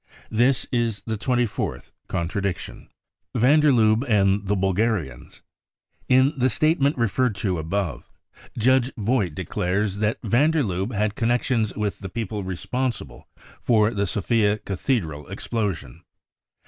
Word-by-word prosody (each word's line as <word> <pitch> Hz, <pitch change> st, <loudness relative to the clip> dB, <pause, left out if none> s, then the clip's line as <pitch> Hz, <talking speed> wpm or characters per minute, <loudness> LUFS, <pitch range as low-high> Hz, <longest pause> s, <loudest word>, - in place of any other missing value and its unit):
This 120 Hz, +4 st, +2 dB
is 115 Hz, -4 st, -1 dB
the 110 Hz, -, -2 dB
twenty 120 Hz, +3 st, +1 dB
fourth 110 Hz, -, -5 dB, 0.2 s
contradiction. 95 Hz, +1 st, -3 dB, 0.5 s
Van 135 Hz, +7 st, +5 dB
der 150 Hz, -1 st, +5 dB
Lubbe 110 Hz, -1 st, +3 dB
and 100 Hz, -2 st, +2 dB
the 105 Hz, -, +2 dB
Bulgarians. 95 Hz, -, -1 dB, 0.7 s
In 130 Hz, +3 st, +5 dB
the 130 Hz, -1 st, +2 dB
statement 150 Hz, +2 st, +2 dB
referred 120 Hz, 0 st, +1 dB
to 95 Hz, -3 st, -1 dB
above, 85 Hz, +3 st, -3 dB, 0.5 s
Judge 130 Hz, +2 st, +3 dB
Vogt 105 Hz, -, 0 dB
declares 95 Hz, +3 st, -1 dB
that 105 Hz, +1 st, +1 dB
van 120 Hz, +8 st, +3 dB
der 160 Hz, -2 st, +1 dB
Lubbe 95 Hz, +2 st, -2 dB
had 105 Hz, 0 st, 0 dB
connections 115 Hz, -1 st, 0 dB
with 105 Hz, -2 st, -2 dB
the 95 Hz, -, -7 dB
people 105 Hz, -1 st, -4 dB
responsible 95 Hz, -, -4 dB, 0.3 s
for 110 Hz, -2 st, +3 dB
the 100 Hz, -1 st, 0 dB
Sofia 105 Hz, +2 st, +1 dB
cathedral 90 Hz, -, -2 dB
explosion. 100 Hz, -, -4 dB
110 Hz, 130 wpm, -24 LUFS, 95-120 Hz, 0.7 s, Van